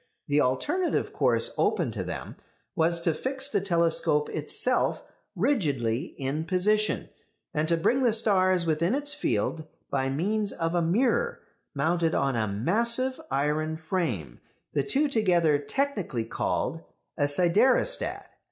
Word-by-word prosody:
The 145 0 +2
alternative 335 - 0
course - - +2
open - - +1
to - - -4
them - - -6 0.4
was 170 -1 +2
to 165 -1 +1
fix 265 - -4
the 285 - 0
telescope 170 -5 +2
itself 155 +11 0 0.3
rigidly 150 - 0
in 140 +3 -3
position, 210 +5 +1 0.4
and 155 -1 0
to 170 - +3
bring 250 +11 +1
the 245 -3 +3
stars 185 -5 +3
within 170 +7 +1
its 290 +1 +1
field 165 - -2 0.2
by 135 -1 0
means 200 +9 -1
of 165 0 -2
a 175 - +2
mirror 245 - +1 0.3
mounted 165 +3 +1
on 135 -2 +1
a 110 -2 0
massive 235 - 0
iron 150 +3 -1
frame 155 - -3 0.3
the 145 - +2
two 280 - +1
together 175 - +2
technically 200 - -2
called 155 +6 -2 0.3
a 145 -2 +1
siderostat. 185 - +2
170 Hz, 135 wpm, -27 LUFS, 150-225 Hz, 0.4 s, to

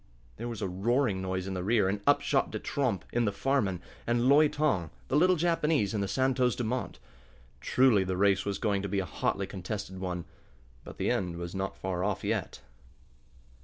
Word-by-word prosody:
There 120 - -5
was 115 -3 -5
a - - 0
roaring 105 +2 0
noise 95 0 -2
in 95 - -4
the 90 -1 -3
rear, 105 -1 +3
and 100 +1 -1
up - - +5
shot - - +1
De - - -4
Tromp 120 -11 -1
in 120 0 +2
the 100 - +1
Farman, 100 -6 0 0.2
and 120 +1 +2
Loi 150 +3 +6
Tong, 135 - 0 0.2
the - - +1
little 180 +4 +5
Japanese, 155 - +1
in 105 - 0
the 100 - -1
Santos 125 +3 +1
Dumont. 125 +1 -3 0.6
Truly 120 - +4
the 95 -1 -2
race 100 0 +3
was 100 -1 -2
going 100 -1 0
to 100 - -4
be 100 - -1
a 95 - 0
hotly 95 +3 -1
contested 95 0 -6
one. 90 -2 -4 0.6
But - - -11
the - - 0
end 90 -3 -1
was 85 0 -6 0.2
far 90 -1 -3
off 100 -1 -1
yet. - - -2
100 Hz, 195 wpm, -29 LUFS, 95-125 Hz, 0.6 s, Loi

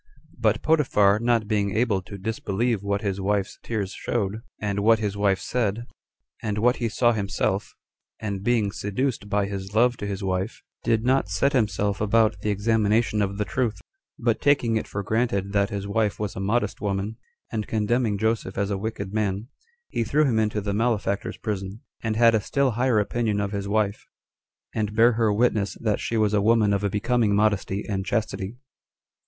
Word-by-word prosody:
But - - +1
Potiphar 105 -10 +3
not 115 -2 +1
being 105 -2 0
able 110 -5 +2
to 100 +2 -9
disbelieve 110 +2 -1
what 100 0 -1
his 100 -1 -2
wife's 100 0 -1
tears 105 -4 -3
showed, 110 -2 -2 0.2
and 100 -1 -1
what 110 +2 +5
his 105 -2 -2
wife 100 -1 +2
said, 115 -2 -1 0.6
and 105 -2 -2
what 120 +3 +3
he 115 -2 -1
saw 120 +2 +3
himself, 100 -1 -1 0.4
and 100 -3 -3
being 110 -3 +2
seduced 105 +2 -2
by 100 -1 +1
his 100 0 -6
love 120 +2 +4
to 105 - -4
his 100 0 -4
wife, 95 +3 -2 0.2
did 115 -1 +1
not 130 -6 +2
set 95 +10 +1
himself 105 -4 0
about 110 -1 +3
the 105 - -2
examination 105 +1 +2
of 100 -1 -1
the 105 - -1
truth; 120 -2 -1 0.4
but 115 -2 0
taking 140 -5 +3
it 110 - -1
for 100 - -4
granted 100 -2 0
that 100 0 +2
his 100 -2 -4
wife 105 -3 0
was 105 -2 -3
a - - -5
modest 105 +1 0
woman, 100 +2 -2 0.3
and 110 -2 -3
condemning 110 0 +1
Joseph 110 -2 -1
as 100 0 0
a 100 - -1
wicked 100 -2 -4
man, 105 +1 -1 0.4
he 115 - -1
threw 150 +7 +2
him 115 -5 +2
into 105 -1 0
the 100 0 -2
malefactors' 105 -2 0
prison; 100 0 -4 0.2
and 110 -1 -1
had 115 0 +5
a 110 - +2
still 140 +5 +1
higher 120 0 +2
opinion 105 0 0
of 100 -1 -1
his 100 -1 -3
wife, 105 -1 0 0.7
and 105 -1 -2
bare 115 +2 +6
her 115 -2 +2
witness 105 -2 +1
that 110 -3 -1
she 115 - -2
was 105 -1 +2
a 105 - +3
woman 110 -1 +4
of 100 0 0
a 100 - +1
becoming 105 +1 +1
modesty 100 -1 +1
and 95 -2 -2
chastity. 105 0 -2
105 Hz, 185 wpm, -25 LUFS, 100-115 Hz, 0.7 s, bare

